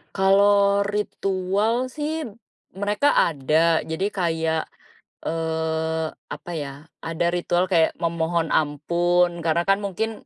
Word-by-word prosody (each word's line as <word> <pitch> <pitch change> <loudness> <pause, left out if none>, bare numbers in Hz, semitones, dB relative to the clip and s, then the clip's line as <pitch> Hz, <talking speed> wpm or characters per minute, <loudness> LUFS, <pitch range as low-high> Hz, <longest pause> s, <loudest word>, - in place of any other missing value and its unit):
Kalau 200 +1 +4
ritual 205 +3 -1
sih, 310 +1 -3 0.5
mereka 205 +9 +1
ada. 160 +2 +2
Jadi 160 +5 -2
kayak, 165 -4 -1 0.6
eee, 160 0 -1 0.3
apa 175 - -7
ya, 145 +1 -7 0.2
ada 165 +1 -2
ritual 175 +1 +1
kayak 165 -2 +3
memohon 170 0 0
ampun, 170 +3 +1
karena 165 +1 +2
kan 195 - +5
mungkin 215 +3 -4
175 Hz, 105 wpm, -23 LUFS, 160-200 Hz, 0.6 s, kan